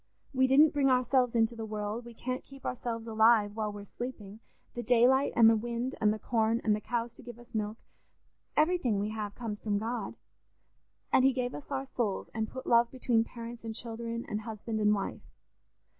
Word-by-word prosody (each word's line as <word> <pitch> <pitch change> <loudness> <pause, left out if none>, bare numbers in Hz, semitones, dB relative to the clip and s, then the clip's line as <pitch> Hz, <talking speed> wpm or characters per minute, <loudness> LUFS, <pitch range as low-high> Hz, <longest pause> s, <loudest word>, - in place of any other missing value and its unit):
We 260 0 +4
didn't 290 +4 +6
bring 280 -2 +3
ourselves 250 -1 +2
into 230 0 +2
the 225 - -5
world, 215 +2 -4
we 235 -1 -11
can't 255 +3 -4
keep 275 -1 -14
ourselves 230 -2 -3
alive 220 -2 +4
while 215 -1 -2
we're 205 0 -8
sleeping; 215 -3 -7 0.3
the 240 - -4
daylight, 245 +4 +4
and 230 -1 +7
the 225 - +6
wind, 240 +3 -2
and 210 -1 +4
the 215 - -2
corn, 225 0 +1
and 210 -1 +3
the 210 - -5
cows 235 0 -2
to - - -14
give 240 -1 -10
us 240 +1 -17
milk—everything 230 - -2
we 205 +1 -1
have 210 -2 -5
comes 220 -3 -5
from 205 -2 -1
God. 230 +4 -3 1.0
And 255 - +6
he 265 0 +5
gave 250 -1 -2
us 290 - -9
our 270 -1 -2
souls 235 -7 -2
and 220 0 -2
put 260 - -8
love 235 0 +4
between 245 -3 +1
parents 235 0 -9
and 225 -1 -5
children, 230 0 -5
and 210 0 -3
husband 220 0 -4
and 210 0 +4
wife. 195 - -4
230 Hz, 195 wpm, -30 LUFS, 220-250 Hz, 1.0 s, and